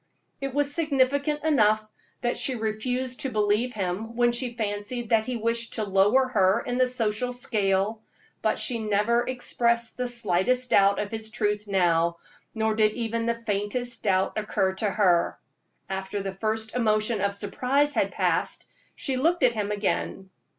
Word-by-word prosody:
It 275 -1 -4
was 290 0 +2
significant 285 -1 +1
enough 215 -8 +3 0.4
that 240 -1 0
she 260 - -1
refused 245 +3 -2
to 275 - -2
believe 215 +2 +1
him 205 +4 -3
when 240 0 +3
she 240 0 -3
fancied 215 +2 -3
that 220 0 +2
he 250 -1 -2
wished 230 +1 -1
to 220 - -1
lower 205 +6 +3
her 195 -3 +3
in 245 +1 -2
the 255 - +4
social 245 0 -1
scale; 215 -3 0 0.4
but - - +1
she 240 -3 0
never 215 +2 +1
expressed 235 -1 0
the 250 0 -1
slightest 240 +2 +1
doubt 200 0 +5
of 205 -1 -3
his 220 -1 -5
truth 210 -2 -2
now, 170 -3 +2 0.4
nor 220 0 +1
did 215 -1 +2
even 230 0 -2
the 235 - +1
faintest 230 +2 -2
doubt 190 +1 +1
occur 195 -3 0
to 205 +2 -1
her. 185 -4 +2 0.5
After 190 +1 -4
the 195 -1 -4
first 220 +2 -2
emotion 215 -2 +1
of 200 0 0
surprise 255 +8 0
had - - +1
passed, - - -1 0.3
she 265 -3 -2
looked 330 +4 +1
at 245 -2 +5
him 210 -2 -2
again. 200 -2 -2
220 Hz, 165 wpm, -26 LUFS, 205-250 Hz, 0.5 s, doubt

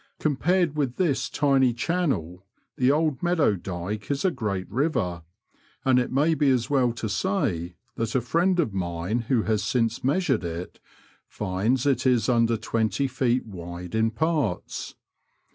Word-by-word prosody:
Compared 155 +3 +1
with 135 -5 -1
this 135 -8 0
tiny 135 -5 +2
channel, 115 - -1 0.3
the 130 +1 +3
Old 150 -3 +1
Meadow 175 - +2
Dyke 95 +3 -5
is 140 +5 -1
a 185 - +4
great 105 - -3
river, 110 - -1 0.6
and 130 -1 +5
it 125 - -2
may 150 +5 +3
be 150 -3 +2
as 125 0 +1
well 130 -4 +3
to 115 -1 -4
say 100 - -1 0.2
that 115 +1 -2
a - - +4
friend 175 +8 +1
of 125 - +1
mine 90 +4 -2
who 120 -5 +3
has 110 -1 0
since 115 +1 0
measured 140 - +1
it 85 +1 -6 0.5
finds 105 +6 -1
it 135 -2 +2
is 120 -4 +3
under 115 -1 +3
twenty 110 +4 0
feet 125 -1 0
wide 90 -3 -8
in 110 0 +2
parts. 145 - -2
125 Hz, 155 wpm, -25 LUFS, 105-145 Hz, 0.6 s, and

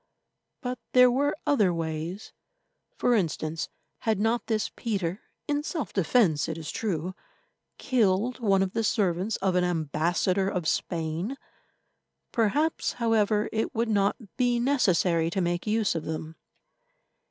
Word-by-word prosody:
But 250 -1 -4
there 250 -1 +7
were 285 +4 +1
other 255 -11 +3
ways. 165 +3 -4 0.6
For 245 - +2
instance, 165 -5 -1 0.3
had 220 -3 0
not 225 +1 0
this 220 -2 0
Peter, 195 -4 -2 0.3
in 290 0 0
self 310 0 -4
defence 175 - +2
it 160 - -3
is 160 -2 -5
true, 185 -4 -2 0.6
killed 230 0 +1
one 195 -5 +3
of 185 - -3
the 225 - 0
servants 200 -1 +1
of 190 -1 0
an 180 0 +2
ambassador 175 +3 +1
of 180 -5 -2
Spain? 170 +10 -2 0.9
Perhaps, 285 +9 +1
however, 220 -3 +2
it 220 0 -2
would 230 +1 0
not 200 -2 +2 0.2
be 245 -1 +2
necessary 185 -10 +2
to 185 - -2
make 175 +2 -1
use 215 -1 +2
of 165 -2 -4
them. 160 0 -5
200 Hz, 135 wpm, -27 LUFS, 170-235 Hz, 0.9 s, there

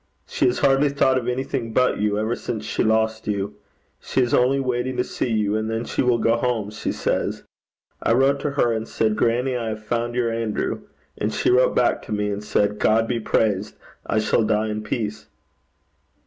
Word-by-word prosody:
She - - +1
has 125 - +1
hardly 140 +1 +3
thought 135 -2 +2
of 120 - -7
anything 125 -2 -2
but 125 -2 +2
you 105 0 +1
ever 110 +3 0
since 110 -3 -5
she - - -1
lost 110 0 +1
you. 100 0 -2 0.5
She - - -2
is 125 - 0
only 130 +3 +3
waiting 125 -1 -1
to 125 - +2
see 125 - -3
you, 105 -2 +1
and 110 0 -1
then 115 +1 -2
she - - -1
will 125 -2 +3
go 115 +1 +2
home, 115 -4 -1
she 105 - -3
says. - - -2 0.6
I - - +2
wrote 135 +3 +3
to 145 - -1
her 140 -4 +1
and 110 0 -3
said, 110 -1 0
"Grannie, 120 +4 +1
I 115 -2 -2
have 110 0 -6
found 120 +1 -2
your 120 -2 +1
Andrew." 115 -2 -2 0.4
And - - 0
she - - +1
wrote 125 +1 +4
back 125 - +2
to - - -8
me 105 0 0
and 100 +1 -4
said, 105 0 0
"God 115 +1 +3
be 120 -1 -1
praised. 105 -2 0 0.3
I - - -1
shall 110 +1 +2
die 110 0 +1
in 105 0 -3
peace."' 110 0 -4
115 Hz, 205 wpm, -23 LUFS, 110-125 Hz, 0.6 s, wrote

